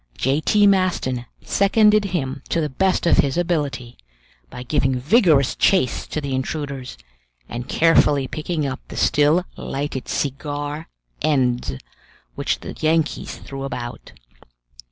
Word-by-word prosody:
J. 135 +4 +1
T. 205 +4 +3
Maston 180 -11 +1 0.2
seconded 210 +1 +3
him 160 -9 -3
to 170 - +1
the 155 -2 -1
best 190 +7 +1
of 170 - +4
his 140 +1 +2
ability, 145 -8 -2 0.5
by 125 - -8
giving 130 0 +1
vigorous 145 - +3
chase 185 -11 +2
to - - -3
the 140 -2 -4
intruders, 135 -1 -4 0.5
and 120 +1 -6
carefully 150 -4 +3
picking 155 +1 -3
up 135 -1 -3
the - - -9
still 150 +5 +3
lighted 135 -2 -4
cigar 145 +2 -3 0.3
ends 125 - +1 0.6
which - - -2
the - - -7
Yankees 160 0 0
threw 135 0 -8
about. 120 -3 -6
145 Hz, 130 wpm, -21 LUFS, 130-170 Hz, 0.6 s, of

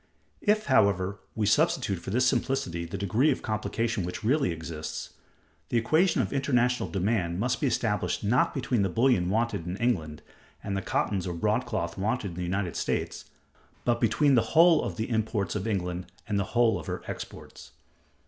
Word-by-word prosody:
If, 215 0 +2
however, 100 -5 +2 0.2
we 110 - 0
substitute 115 - +2
for 85 - -8
this 125 +6 +2
simplicity 125 -9 0
the 85 +4 -5
degree 105 +9 +2
of - - -1
complication 110 0 -1
which 90 +4 -5
really 135 +3 +2
exists, 80 -1 -6 0.6
the 120 - +1
equation 160 +10 +3
of - - -4
international 125 -3 +1
demand 95 -3 0
must 125 +4 0
be 145 - +2
established 105 -7 0
not 115 +5 +3
between 125 -4 0
the 95 - +1
bullion 115 -4 +2
wanted 110 -5 -1
in 90 +2 -3
England 80 -11 -1 0.4
and 100 -1 -3
the 95 - -1
cottons 95 -2 -1
or 90 - -3
broadcloth 110 +3 -1
wanted 105 +1 -1
in 85 - -10
the - - -3
United 90 0 -2
States, - - -2 0.6
but 120 -1 +1
between 140 +5 +3
the 120 - +5 0.2
whole 170 0 +7
of - - -4
the 110 0 -3
imports 110 -3 -1
of 105 +1 -3
England 90 -4 -2 0.2
and 105 -2 0
the 100 - 0
whole 120 -2 +4
of - - -10
her - - -4
exports. - - -8
110 Hz, 175 wpm, -28 LUFS, 95-125 Hz, 0.6 s, whole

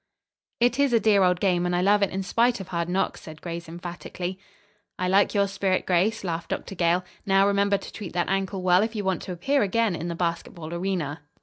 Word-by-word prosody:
"It 245 +2 +2
is 280 -3 +3
a 230 - +5
dear 210 -3 +4
old 180 -1 +3
game, 180 -3 +2
and 180 0 0
I 175 - +1
love 205 +2 +4
it 200 - +3
in 190 0 -3
spite 235 +4 +2
of 190 -1 -8
hard 170 -1 -2
knocks," 190 +2 -1
said 155 -1 -10
Grace 170 -1 -6
emphatically. 175 +2 -6 0.6
"I 180 - -1
like 195 +3 +3
your 200 0 +3
spirit, 195 -1 0
Grace," 190 +5 +1
laughed 170 -2 -3
Dr. - - -4
Gale. 175 0 +1 0.2
"Now, 195 -1 +4
remember 200 0 +2
to - - -10
treat 205 -5 -7
that 175 -1 0
ankle 195 -1 -1
well 180 0 +5
if 220 +1 -2
you 210 - -2
want 190 -3 0
to - - -6
appear 270 +12 +1
again 210 0 +1
in 165 +1 -4
the 170 - -3
basketball 170 -1 -3
arena." 170 -4 -2
185 Hz, 225 wpm, -25 LUFS, 175-200 Hz, 0.6 s, a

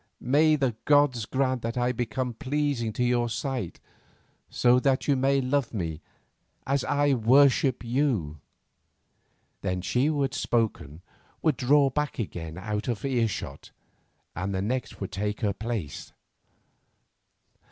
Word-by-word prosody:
May 155 +5 +3
the 135 -4 +1
good 110 - -25
gods 145 -6 +3
grant 130 -2 0
that 115 +1 -4
I 125 0 +2
become 125 +1 -3
pleasing 140 -3 -1
to 125 - -1
your 120 -1 +1
sight, 125 - -4 0.7
so 125 0 +4
that 130 0 +1
you 140 - +4
may 135 +1 +2
love 130 -2 -1
me 80 -5 -3 0.6
as 140 -1 0
I 145 0 +2
worship 130 +2 +4
you." 115 - 0 1.2
Then 90 -1 -2
she 125 +9 +1
who 150 -2 +1
had 135 0 -2
spoken 105 - -1 0.4
would 155 -4 +3
draw 140 +2 +3
back 150 +2 -2
again 80 -6 -5
out 105 +3 -3
of 120 0 -2
earshot, 120 -5 -2 0.7
and 95 +2 -3
the 95 - -1
next 125 +5 -3
would 95 - -5
take 105 +2 -3
her 105 -3 +1
place. 105 -7 -5
125 Hz, 140 wpm, -27 LUFS, 105-135 Hz, 1.2 s, so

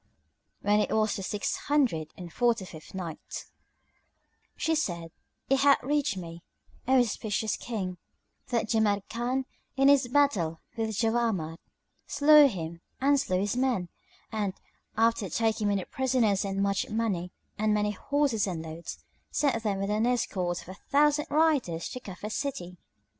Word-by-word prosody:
When 205 +1 +4
it - - +1
was 215 -1 +2
the - - -4
Six 205 +2 -2
Hundred 235 - +1
and 175 -2 -9
Forty 235 -5 +2
fifth 160 0 -12
Night, 170 -4 -6 1.1
She 320 - +1
said, 170 - -2 0.4
It 270 0 +3
hath 280 0 +5
reached 285 -7 0
me, 170 -1 -7 0.5
O 265 0 +5
auspicious 220 -2 0
King, 185 -6 -4 0.5
that 235 -3 0
Jamrkan 225 +4 0 0.3
in 270 +1 +5
his 280 -3 +5
battle 220 - +2 0.2
with 220 -3 -2
Jawamard 225 -9 0 0.5
slew 295 +1 +7
him 170 -7 -5 0.2
and 280 +1 +4
slew 185 -7 0
his 205 +2 -1
men; 250 -9 0 0.4
and, 205 -4 -2 0.4
after 225 -3 +2
taking 220 +2 +1
many 200 -2 0
prisoners 240 -7 +1
and 195 0 -1
much 200 +6 0
money 210 -6 -1 0.3
and 215 0 +2
many 210 0 +2
horses 270 -1 0
and 170 -4 -3
loads, 160 +1 -8 0.3
sent 270 -6 +1
them 205 -3 -1
with 195 +1 -1
an 215 +3 +2
escort 185 -8 -1
of - - -15
a - - -6 0.2
thousand 295 +1 +3
riders, 285 - +2
to 255 - -6
Cufa 210 -1 -7
city. 180 - -4
215 Hz, 145 wpm, -28 LUFS, 185-260 Hz, 1.1 s, slew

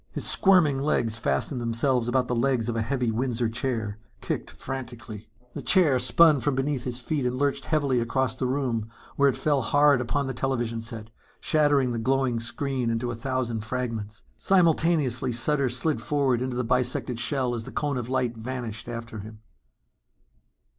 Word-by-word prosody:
His - - -3
squirming 180 -9 +4
legs 120 -6 0
fastened 115 - -1
themselves 120 +1 0
about 125 0 +1
the 125 - -1
legs 120 -1 +1
of 120 - -2
a 115 - 0
heavy 125 0 -1
Windsor 120 0 -1
chair, 115 -3 -3 0.2
kicked - - -4
frantically. 120 -5 -7 0.2
The - - -5
chair 160 -9 +4
spun 150 +4 +5
from 145 +1 0
between 135 +1 0
his 125 0 -3
feet 140 +3 -2
and 125 0 -1
lurched 140 0 0
heavily 140 -5 +1
across 120 +1 0
the 130 0 -2
room 125 -5 -1 0.3
where 140 0 +4
it 130 - -2
fell 145 -3 +1
hard 145 +1 +4
upon 140 +3 -1
the 135 - -3
television 120 -3 -2
set, 115 -1 -8 0.3
shattering 145 -4 +2
the 115 - -2
glowing 130 0 +1
screen 125 +1 -2
into 115 +1 -1
a - - -4
thousand 120 -2 -2
fragments. 110 -3 -4 0.2
Simultaneously, 160 - +2
Sutter 135 +3 +1
slid 130 +6 -1
forward 135 -5 +1
into 130 -1 -2
the 125 - 0
bisected 125 0 -1
shell 125 0 0
as 115 -2 -4
the - - -8
cone 145 -3 -1
of 120 -1 -4
light 125 -2 0
vanished 115 -2 -5
after 115 -2 -6
him.... 105 +1 -10
125 Hz, 175 wpm, -26 LUFS, 115-140 Hz, 0.3 s, spun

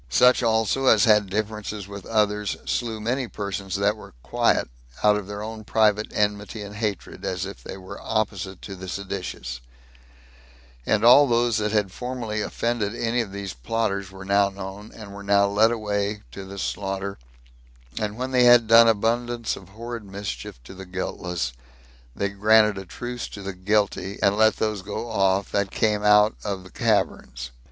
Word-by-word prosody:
Such 125 - +5
also 115 +3 +1
as 110 -4 +6
had 105 -3 +4
differences 105 -1 -3
with 100 -1 -9
others 105 -2 +1
slew 115 -3 -2
many 125 +4 -1
persons 100 -2 -4
that 100 +1 +2
were 105 - -13
quiet, - - +2 0.4
out 105 0 +6
of 105 -2 -4
their 105 0 -5
own 110 0 -7
private 105 0 +2
enmity 105 +1 -1
and 100 0 -9
hatred, 105 -4 -4
as 90 0 -2
if 100 - -8
they - - -8
were 95 -1 -10
opposite 100 -4 -2
to 100 - -7
the 95 0 -9
seditious; 90 -10 -5 1.3
and 110 +1 +2
all 140 +4 +8
those 120 -2 +2
that 105 -1 0
had 105 -3 +1
formerly 120 -2 -4
offended 115 0 -1
any 120 +1 0
of 105 -4 -6
these 100 -1 -5
plotters 100 - -2
were 95 0 -10
now 100 0 +3
known, 100 +1 -8
and 105 -3 -10
were 100 - -8
now 100 0 +4
led 105 +3 +4
away 105 -2 -2
to 100 - -8
the 100 +1 -9
slaughter; 95 0 -3 0.8
and 105 0 -3
when 130 +1 -3
they 125 -1 +4
had 120 -1 +7
done 115 +1 +8
abundance 115 +2 0
of 95 -1 -13
horrid 115 +2 -7
mischief 100 -9 -6
to 80 - -11
the 95 0 -10
guiltless, 90 -6 -3 0.6
they 100 - -1
granted 105 +1 +4
a 95 - -9
truce 120 +5 -5
to 100 - -9
the 95 0 -4
guilty, 100 +1 0
and 100 0 +4
let 110 +1 +4
those 110 -3 -1
go 110 +4 -5
off 95 -1 +1
that 100 -1 0
came 105 0 +1
out 105 +1 +5
of 100 -3 -3
the 95 - -14
caverns. - - -1
105 Hz, 175 wpm, -24 LUFS, 100-110 Hz, 1.3 s, all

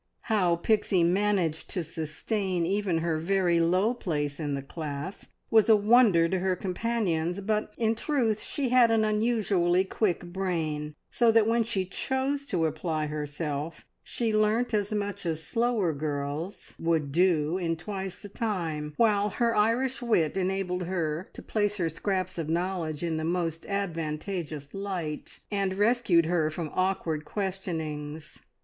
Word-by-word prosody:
How 185 -6 +2
Pixie 190 0 +2
managed 180 -3 +1
to 180 - -2
sustain 175 +4 -2
even 195 -1 0
her 160 -2 0
very 175 0 +2
low 185 +7 +3
place 150 - -2
in 145 -3 -1
the 135 - -4
class 150 +4 -6 0.2
was 225 0 +5
a 220 - +9
wonder 210 -5 +5
to 185 +2 0
her 185 0 +1
companions; 185 -3 -1
but 215 +1 -1
in 225 -1 +2
truth 230 -3 0
she 275 -4 -2
had 245 -1 +6
an 225 -1 +3
unusually 210 -5 +2
quick 190 -3 -1
brain, 155 -5 -2 0.2
so 235 -2 +4
that 225 -1 +5
when 230 +1 +3
she 210 -4 -1
chose 265 +8 -2
to 175 -9 +1
apply 155 0 -1
herself 150 +1 -4 0.2
she 225 -3 -1
learnt 220 +3 +2
as 205 -1 0
much 205 -1 -2
as 160 -1 -2
slower 230 -7 +1
girls 145 +4 -4
would 160 -4 0
do 170 0 +2
in 165 -2 0
twice 190 +2 -5
the 205 - -10
time, 165 -9 -3
while 210 -3 +3
her 230 +2 +1
Irish 235 +5 +2
wit 215 -10 +2
enabled 185 -1 -1
her 170 -2 -2
to - - -9
place 210 -1 0
her 170 -4 0
scraps 185 +2 -2
of 160 -2 -3
knowledge 170 -2 -1
in 165 -2 -1
the 160 - -2
most 165 -1 -1
advantageous 165 -5 -3
light, 185 -6 -5
and 195 -2 0
rescued 205 -5 +3
her 160 -2 +1
from 155 0 -5
awkward 185 -5 0
questionings. 160 -6 -4
185 Hz, 150 wpm, -28 LUFS, 160-210 Hz, 0.2 s, a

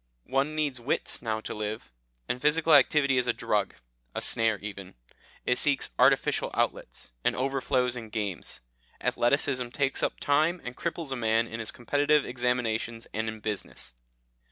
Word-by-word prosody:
One 140 +3 +1
needs 145 -5 -1
wits 120 +5 -1
now 110 -2 -2
to - - -5
live, 105 - -5 0.4
and 125 - -2
physical 155 +2 +3
activity 140 -1 +5
is 125 - -1
a - - +3
drug, - - -1 0.4
a - - 0
snare 115 -2 +3
even; 100 -2 -8 0.5
it 125 - +2
seeks 140 - +2
artificial - - +3
outlets, - - -2
and - - +2
overflows 130 -1 0
in 115 -3 -7
games. 105 -4 -4 0.4
Athleticism 130 0 +1
takes 135 +2 0
up - - -1
time 155 +5 +2
and 125 0 -6
cripples 165 -4 -3
a - - 0
man 115 -1 +2
in 115 0 -7
his 115 - -3
competitive 145 +4 +2
examinations, 120 -2 -1
and 110 +1 -1
in 110 -1 -8
business. 105 - -4
125 Hz, 155 wpm, -28 LUFS, 110-140 Hz, 0.5 s, activity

